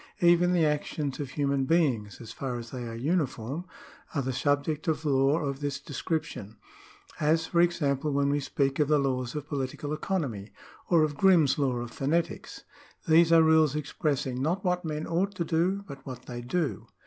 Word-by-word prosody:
Even 175 Hz, +1 st, +5 dB
the 170 Hz, -3 st, +3 dB
actions 150 Hz, -2 st, -2 dB
of 140 Hz, -3 st, -4 dB
human 140 Hz, 0 st, 0 dB
beings, 130 Hz, -11 st, +1 dB
so 115 Hz, -, -11 dB
far 120 Hz, +3 st, -5 dB
as 115 Hz, -1 st, -8 dB
they 125 Hz, -2 st, -5 dB
are 115 Hz, -, -6 dB
uniform, 140 Hz, +1 st, -2 dB, 0.5 s
are 140 Hz, -, 0 dB
the 130 Hz, +1 st, -2 dB
subject 145 Hz, +4 st, 0 dB
of 160 Hz, 0 st, -1 dB
law 135 Hz, +1 st, +3 dB
of 140 Hz, -4 st, -3 dB
this 145 Hz, -1 st, -3 dB
description: 145 Hz, -, -4 dB, 0.6 s
as, 160 Hz, +2 st, +2 dB
for 170 Hz, +1 st, +2 dB
example, 150 Hz, -4 st, +1 dB
when 140 Hz, 0 st, +1 dB
we 145 Hz, -, +1 dB
speak 135 Hz, 0 st, -1 dB
of 150 Hz, -, +3 dB
the 150 Hz, 0 st, +4 dB
laws 130 Hz, -3 st, -1 dB
of 150 Hz, -1 st, -5 dB
political 145 Hz, 0 st, -3 dB
economy, 145 Hz, -, -3 dB, 0.4 s
or 170 Hz, -3 st, +5 dB
of 150 Hz, -1 st, -1 dB
Grimm's 165 Hz, -8 st, +4 dB
law 135 Hz, -3 st, +1 dB
of 120 Hz, -1 st, -5 dB
phonetics. 160 Hz, +7 st, -2 dB, 0.4 s
These 165 Hz, +1 st, +5 dB
are 165 Hz, -1 st, +7 dB
rules 160 Hz, -2 st, +4 dB
expressing 140 Hz, -4 st, -2 dB
not 175 Hz, +7 st, -1 dB
what 180 Hz, 0 st, +1 dB
men 155 Hz, -1 st, -3 dB
ought 190 Hz, +4 st, -1 dB
to 170 Hz, -, -2 dB
do, 180 Hz, +5 st, 0 dB
but 140 Hz, -2 st, -10 dB
what 125 Hz, -2 st, -8 dB
they 120 Hz, -1 st, -6 dB
do. 130 Hz, -, -2 dB
145 Hz, 185 wpm, -28 LUFS, 130-165 Hz, 0.6 s, are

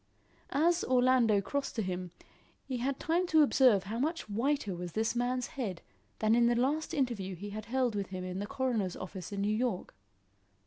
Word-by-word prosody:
As 335 Hz, +4 st, +3 dB
Orlando 250 Hz, -5 st, +4 dB
crossed 280 Hz, +7 st, -3 dB
to 225 Hz, -, 0 dB
him, 180 Hz, -1 st, -3 dB, 0.6 s
he 255 Hz, -, -3 dB
had 265 Hz, +3 st, -2 dB
time 345 Hz, +3 st, +1 dB
to 315 Hz, -2 st, +5 dB
observe 255 Hz, -8 st, +4 dB
how 215 Hz, +4 st, -4 dB
much 320 Hz, +2 st, -1 dB
whiter 225 Hz, -1 st, 0 dB
was 175 Hz, -1 st, -6 dB
this 225 Hz, +2 st, 0 dB
man's 245 Hz, +1 st, 0 dB
head 205 Hz, -10 st, -5 dB, 0.3 s
than 215 Hz, 0 st, +2 dB
in 235 Hz, 0 st, +5 dB
the 240 Hz, -, +3 dB
last 285 Hz, +6 st, 0 dB
interview 230 Hz, -9 st, -1 dB
he 205 Hz, +4 st, -7 dB
had 215 Hz, +1 st, -6 dB
held 250 Hz, 0 st, 0 dB
with 200 Hz, -2 st, -2 dB
him 185 Hz, -1 st, -5 dB
in 185 Hz, +1 st, -4 dB
the 205 Hz, -, -3 dB
coroner's 245 Hz, -9 st, -1 dB
office 185 Hz, +1 st, -7 dB
in 200 Hz, -1 st, -3 dB
New 210 Hz, +1 st, +1 dB
York. 230 Hz, -5 st, -2 dB
235 Hz, 190 wpm, -31 LUFS, 200-260 Hz, 0.6 s, to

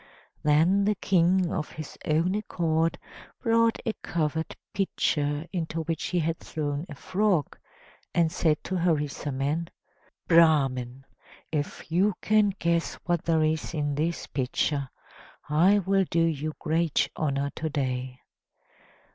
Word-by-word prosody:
Then 165 Hz, +7 st, +3 dB
the 210 Hz, +1 st, +2 dB
King 185 Hz, -1 st, +2 dB
of 155 Hz, -, -2 dB
his 155 Hz, -2 st, -8 dB
own 165 Hz, +4 st, +2 dB
accord 165 Hz, -5 st, 0 dB, 0.4 s
brought 230 Hz, -1 st, +3 dB
a 225 Hz, -, 0 dB
covered 160 Hz, -1 st, -2 dB, 0.2 s
pitcher 150 Hz, -6 st, 0 dB
into 165 Hz, -2 st, -2 dB
which 165 Hz, 0 st, -3 dB
he 180 Hz, -, -1 dB
had 165 Hz, 0 st, 0 dB
thrown 150 Hz, +1 st, -3 dB
a 145 Hz, -, -7 dB
frog, 185 Hz, -2 st, 0 dB, 0.6 s
and 165 Hz, -2 st, +2 dB
said 160 Hz, -3 st, +1 dB
to 185 Hz, -, -2 dB
Harisarman: 150 Hz, -2 st, -1 dB, 0.6 s
"Brahman, 135 Hz, -6 st, +3 dB, 0.5 s
if 150 Hz, 0 st, -4 dB
you 190 Hz, +4 st, +3 dB
can 215 Hz, -1 st, +3 dB
guess 170 Hz, -2 st, 0 dB
what 175 Hz, -2 st, 0 dB
there 160 Hz, -2 st, +3 dB
is 155 Hz, +1 st, -1 dB
in 145 Hz, -1 st, -1 dB
this 160 Hz, +4 st, -1 dB
pitcher, 140 Hz, +1 st, -1 dB, 0.6 s
I 170 Hz, +7 st, +4 dB
will 195 Hz, 0 st, +2 dB
do 165 Hz, 0 st, +2 dB
you 155 Hz, -1 st, -2 dB
great 165 Hz, -1 st, +1 dB
honor 140 Hz, -2 st, -1 dB
to 160 Hz, -, -2 dB
day." 130 Hz, -3 st, -3 dB
160 Hz, 130 wpm, -27 LUFS, 145-175 Hz, 0.6 s, I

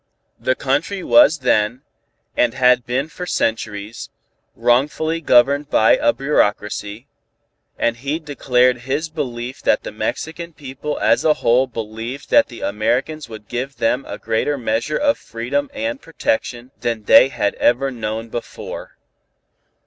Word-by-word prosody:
The 130 Hz, -, +1 dB
country 150 Hz, +10 st, -1 dB
was 295 Hz, -, +6 dB
then, 115 Hz, +3 st, +2 dB, 0.5 s
and 120 Hz, 0 st, +2 dB
had 125 Hz, -1 st, +3 dB
been 130 Hz, +4 st, -1 dB
for 180 Hz, +2 st, -7 dB
centuries, 105 Hz, -3 st, -2 dB, 0.5 s
wrongfully 150 Hz, +6 st, +1 dB
governed 140 Hz, +1 st, +4 dB
by 110 Hz, -, +5 dB
a -, -, +3 dB
bureaucracy, 105 Hz, -4 st, -1 dB, 0.7 s
and 115 Hz, 0 st, 0 dB
he 140 Hz, +5 st, -2 dB
declared 125 Hz, -5 st, +1 dB
his 155 Hz, +4 st, -1 dB
belief 130 Hz, -5 st, -5 dB
that -, -, +2 dB
the -, -, -6 dB
Mexican 160 Hz, +10 st, -4 dB
people 145 Hz, +1 st, -6 dB
as -, -, +3 dB
a 155 Hz, -1 st, +4 dB
whole 125 Hz, +3 st, +4 dB
believed 115 Hz, +3 st, -6 dB
that 290 Hz, 0 st, +6 dB
the -, -, -11 dB
Americans 155 Hz, -, -1 dB
would 110 Hz, -2 st, -10 dB
give 130 Hz, +3 st, -4 dB
them 125 Hz, +4 st, +1 dB
a -, -, -6 dB
greater 115 Hz, +6 st, -1 dB
measure 120 Hz, +4 st, -1 dB
of 285 Hz, -1 st, +1 dB
freedom 125 Hz, +5 st, -3 dB
and 280 Hz, +1 st, -4 dB
protection 130 Hz, -, -2 dB
than 115 Hz, -2 st, -2 dB
they 125 Hz, -, +7 dB
had 105 Hz, -6 st, -1 dB
ever 135 Hz, +3 st, +2 dB
known 115 Hz, -1 st, -4 dB
before. 120 Hz, -, -7 dB
130 Hz, 140 wpm, -20 LUFS, 115-150 Hz, 0.7 s, they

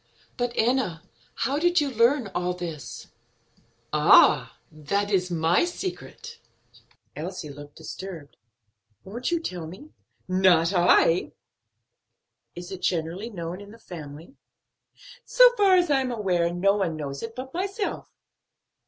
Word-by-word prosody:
But, 245 Hz, -1 st, -2 dB
Enna, 225 Hz, -9 st, 0 dB, 0.3 s
how 275 Hz, +4 st, -1 dB
did 350 Hz, +2 st, +3 dB
you 290 Hz, -2 st, -1 dB
learn 240 Hz, +1 st, +2 dB
all 180 Hz, 0 st, -1 dB
this?" 165 Hz, -4 st, -7 dB, 0.8 s
"Ah, -, -, +5 dB
that 200 Hz, +7 st, -2 dB
is 185 Hz, -2 st, +1 dB
my 165 Hz, 0 st, +2 dB
secret." 380 Hz, +6 st, -6 dB, 0.8 s
Elsie 165 Hz, 0 st, -6 dB
looked 145 Hz, +1 st, -12 dB
disturbed. 160 Hz, -2 st, -9 dB, 0.7 s
"Won't 235 Hz, +6 st, -4 dB
you 340 Hz, -1 st, +1 dB
tell 180 Hz, -, -5 dB
me?" 195 Hz, -, -12 dB, 0.4 s
"Not 185 Hz, -2 st, +3 dB
I." 175 Hz, -1 st, +3 dB, 1.2 s
"Is 175 Hz, +1 st, -8 dB
it 190 Hz, -, -7 dB
generally 175 Hz, +6 st, -2 dB
known 175 Hz, -2 st, -6 dB
in 205 Hz, -, -12 dB
the 225 Hz, -, -13 dB
family?" 160 Hz, -, -10 dB, 0.9 s
"So -, -, +6 dB
far 395 Hz, -4 st, +5 dB
as 350 Hz, -4 st, +2 dB
I 270 Hz, -1 st, +3 dB
am 255 Hz, -1 st, -2 dB
aware, 180 Hz, -7 st, 0 dB
no 195 Hz, +3 st, +2 dB
one 180 Hz, -5 st, -1 dB
knows 140 Hz, -2 st, -5 dB
it 230 Hz, 0 st, -7 dB
but 260 Hz, +1 st, -7 dB
myself." 395 Hz, +3 st, -3 dB
190 Hz, 130 wpm, -25 LUFS, 170-260 Hz, 1.2 s, So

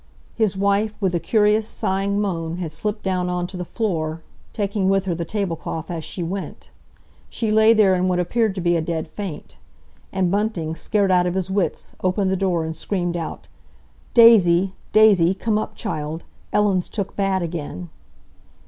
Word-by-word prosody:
His 215 Hz, -4 st, 0 dB
wife, 200 Hz, +2 st, +1 dB
with 190 Hz, -3 st, 0 dB
a 175 Hz, -, +1 dB
curious 210 Hz, +4 st, +2 dB
sighing 200 Hz, -1 st, -1 dB
moan, 170 Hz, -5 st, -2 dB
had 170 Hz, -4 st, -4 dB
slipped 210 Hz, +6 st, -3 dB
down 185 Hz, -2 st, -1 dB
on 180 Hz, 0 st, -1 dB
to 185 Hz, -, -8 dB
the 180 Hz, -, -3 dB
floor, 165 Hz, -6 st, -3 dB, 0.3 s
taking 200 Hz, -2 st, -1 dB
with 195 Hz, 0 st, +2 dB
her 180 Hz, -, 0 dB
the 170 Hz, 0 st, -3 dB
tablecloth 165 Hz, -4 st, -4 dB
as 165 Hz, -2 st, -4 dB
she 175 Hz, -, -4 dB
went. 190 Hz, +3 st, -6 dB, 0.6 s
She 225 Hz, -2 st, -2 dB
lay 220 Hz, +1 st, +6 dB
there 210 Hz, -4 st, +4 dB
in 185 Hz, 0 st, +1 dB
what 180 Hz, -1 st, +1 dB
appeared 210 Hz, +4 st, 0 dB
to 185 Hz, -, -3 dB
be 175 Hz, 0 st, +2 dB
a 165 Hz, -, +1 dB
dead 160 Hz, 0 st, -3 dB
faint. 180 Hz, -2 st, -7 dB, 0.5 s
And 185 Hz, -2 st, 0 dB
Bunting, 195 Hz, -6 st, -1 dB
scared 200 Hz, +3 st, +1 dB
out 180 Hz, -1 st, +3 dB
of 175 Hz, -, -2 dB
his 190 Hz, 0 st, -2 dB
wits, 195 Hz, -2 st, -2 dB
opened 185 Hz, +1 st, +1 dB
the -, -, +2 dB
door 180 Hz, -3 st, 0 dB
and 160 Hz, 0 st, -4 dB
screamed 175 Hz, 0 st, -2 dB
out, 165 Hz, -2 st, -5 dB, 0.7 s
"Daisy! 195 Hz, -6 st, +6 dB, 0.2 s
Daisy! 200 Hz, -5 st, +5 dB
Come 215 Hz, +2 st, 0 dB
up, -, -, -5 dB
child. 155 Hz, +2 st, -4 dB, 0.3 s
Ellen's 195 Hz, -4 st, +1 dB
took 200 Hz, -3 st, -4 dB
bad 195 Hz, -2 st, 0 dB
again." 170 Hz, +1 st, -5 dB
190 Hz, 175 wpm, -22 LUFS, 170-205 Hz, 0.7 s, lay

